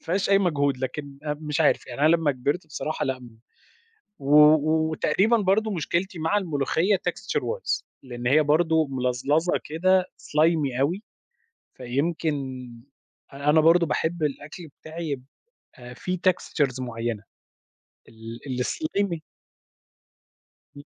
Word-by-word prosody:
ما - - -24
فيهاش 190 +4 0
أي 195 - +6
مجهود، 145 -7 +1
لكن 140 +2 -5
آمم، 150 0 -2
مش 150 +2 -1
عارف 150 - +2
يعني 125 +2 -7
أنا 155 - +5
لمّا 165 -3 +3
كبرت 145 +7 -2
بصراحة 155 +1 -3
لأ 130 -1 -2
م 115 -2 -14 0.8
و 140 +2 +2 0.6
وتقريبًا 200 +9 +2
برضه 210 +2 +1
مشكلتي 175 +1 -2
مع 165 +6 +1
الملوخية 165 +2 +1
Texture - - -3
wise 480 +1 -2 0.2
لإن 120 -1 -5
هي 150 +4 +5
برضه 160 +1 +2
ملظلظة 135 +6 0
كده 185 +4 +2 0.2
slimy 150 -4 +1
أوي 175 +10 0 0.7
فيمكن 150 +6 -1 1.0
أ 140 +2 -2
أنا 155 +1 +6
برضه 170 +2 +5
باحب 165 0 -1
الأكل 155 +4 -4
بتاعي 160 +1 -6 0.5
يبقى 125 0 -14
فيه 180 +7 -3
Textures 140 -7 0
معيّنة 115 -3 -4 0.9
ال 115 +3 -6
الslimy 200 - -2 1.6
امم. 145 - -10
155 Hz, 125 wpm, -25 LUFS, 135-175 Hz, 1.6 s, أي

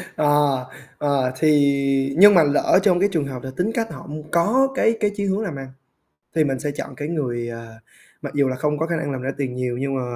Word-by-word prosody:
Ờ, 145 -3 +2 0.3
ờ, 140 -3 0
thì 140 -3 +2
nhưng 205 +3 +9
mà 170 -4 +6
lỡ 145 +5 +3
trong 185 -4 +3
cái 200 +2 +2
trường 160 -6 0
hợp 130 -3 -7
là 130 - -6
tính 185 +5 0
cách 225 -1 -2
họ - - -10
m - - -7 0.2
có 215 +11 +3
cái 225 -3 +2
cái 210 -1 +1
chí 200 - -2
hướng 195 +2 0
làm 175 -9 -4
ăn, 135 -1 -7 0.7
thì 160 - +4
mình 135 -3 -2
sẽ 145 +2 -3
chọn 145 - -7
cái 145 0 -5
người, 125 -7 -3
ờ, 115 0 -8 0.5
mặc - - -7
dù 140 -1 +2
là 130 - -2
không 150 +3 -1
có 160 +2 -1
khả 170 - -1
năng 160 -3 -3
làm 130 -2 -4
ra 130 +1 -2
tiền 130 -3 -3
nhiều 125 -1 -3
nhưng 135 +1 -2
mà 130 - -1
145 Hz, 250 wpm, -21 LUFS, 135-170 Hz, 0.7 s, nhưng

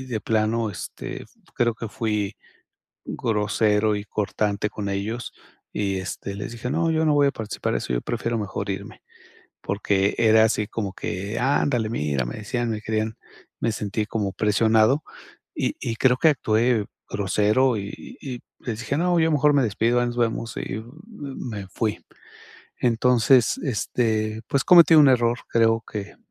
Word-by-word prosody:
de 115 -4 -3
plano, 110 +1 0
este, 90 - -7 0.3
creo 120 -1 +1
que 115 0 -6
fui 105 -2 -2 0.7
grosero 105 -1 +1
y 100 - -6
cortante 105 0 -1
con 105 0 -5
ellos 110 +5 -3 0.4
y, 100 -2 -1
este, 95 +2 -5
les 105 +3 -5
dije: 120 +1 -5
"No, 165 +4 +1
yo 160 0 +1
no 155 - +3
voy 145 -1 +5
a 140 - +1
participar 110 -2 -3
eso, - - -3
yo - - 0
prefiero 115 0 -2
mejor 100 -1 -4
irme". 95 - -6 0.6
Porque 100 -1 0
era 110 -1 +6
así 105 -1 +1
como 105 -4 -3
que: 100 +6 -4
"Ándale, 125 -3 +1
mira", 75 - -1
me - - -6
decían, 120 +3 -2
me 110 - -3
querían 110 0 -2 0.4
me 115 - +1
sentí 105 0 -2
como 105 -4 -2
presionado 110 +6 +3 0.5
y - - -1
y 115 - -3
creo 125 +1 +4
que 160 - +5
actué 115 -4 +1 0.3
grosero 105 +5 +2
y 100 0 -8
y 130 -3 -5
y - - -12 0.2
les 115 -3 -3
dije: 135 +3 -2
"No, 175 +1 +2
yo 160 - +3
mejor 150 0 +4
me 140 - +4
despido. 115 +3 +1
Ahí 120 - +1
nos 120 - -4
vemos". 115 0 -1
Y, - - -4
m 110 +1 -7 0.5
me 105 -6 -6
fui. 105 +3 -2 0.8
Entonces, 120 0 +3
este, 110 -2 -1
pues 140 - +1
cometí 170 -2 +8
un 150 -2 +8
error, 120 -2 +3
creo 115 -1 +3
que, 105 -1 -6
110 Hz, 165 wpm, -24 LUFS, 105-120 Hz, 0.8 s, cometí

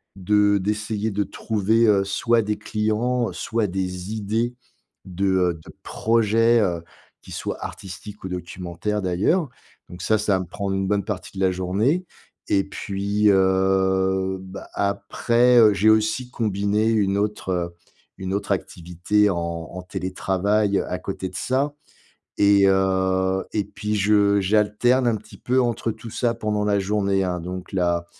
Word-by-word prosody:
de 100 +2 +3
d'essayer 105 +2 -2
de 105 +1 0
trouver, 110 +2 +1
heu, 100 -2 +4
soit 115 +4 +2
des 105 0 -2
clients, 110 +3 -1
soit 115 -2 -1
des 90 +1 -4
idées 110 +3 -1 0.5
de, 95 +1 -3
heu, 90 -2 +2
de - - -11
projets, 115 +1 +2
heu, 85 -4 -1 0.4
qui - - -14
soient - - -4
artistiques 100 +2 -9
ou - - -4
documentaires 90 +3 -4
d'ailleurs 100 - +1 0.4
donc 90 +1 -10
ça, 110 - +3
ça 105 -1 +1
va 95 - 0
me - - -5
prendre 100 +1 -3
une 95 0 -1
bonne 100 0 0
partie 100 -2 -6
de 95 - +1
la 95 - +3
journée 105 - 0 0.4
et 95 - +3
puis, 100 +2 0
heu, 95 0 +2
bah, 95 +1 -9
après, 115 +5 +2
heu, 110 -2 +7
j'ai 100 +3 +3
aussi 110 +3 +2
combiné 105 -1 0
une 100 -3 +1
autre 95 -4 -2 0.4
une 95 0 -4
autre 100 0 -2
activité 90 +2 0
en 90 - -1
en 85 +1 -5
télétravail 100 +2 0
à - - -4
côté 95 - -5
de 95 - -14
ça 135 +8 0 0.7
et 100 -1 +5
heu, 95 0 +1
et 105 - +1
puis 105 +1 -4
je 100 0 +3
j'alterne 105 +6 +2
un 115 - +1
petit 105 -1 -13
peu 130 +1 +1
entre 115 -1 -1
tout 110 +1 -10
ça 120 +1 0
pendant 105 -2 -1
la 105 -1 +2
journée 100 -1 0
hein, 90 -1 -2
donc 90 +2 -7
la 85 -2 0
100 Hz, 155 wpm, -23 LUFS, 95-110 Hz, 0.7 s, heu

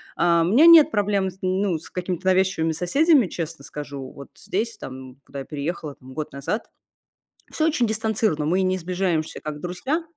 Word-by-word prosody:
А, 170 -1 +3
у - - +1
меня 275 +9 +6
нет 330 -3 +9
проблем 200 -3 +1
с, 185 - -14
ну, 185 -1 0
с 155 - -13
какими-то 180 0 -4
навязчивыми 185 -3 +2
соседями, 270 - +3
честно 165 -4 -6
скажу. 140 -2 -7
Вот 140 - -12
здесь, 225 +4 -3
там, 130 -1 -9
куда 140 - -8
я 135 - -6
переехала 150 0 -5
там 130 +1 -14
год 155 +2 -5
назад, 140 - -3 0.8
всё 315 - 0
очень 295 -7 +2
дистанцированно, 220 -7 0
мы 180 +5 +2
не 185 0 +1
сближаемся, 180 -3 -2
как 150 -1 -6
друзья. 265 - -2
180 Hz, 175 wpm, -23 LUFS, 155-210 Hz, 0.8 s, нет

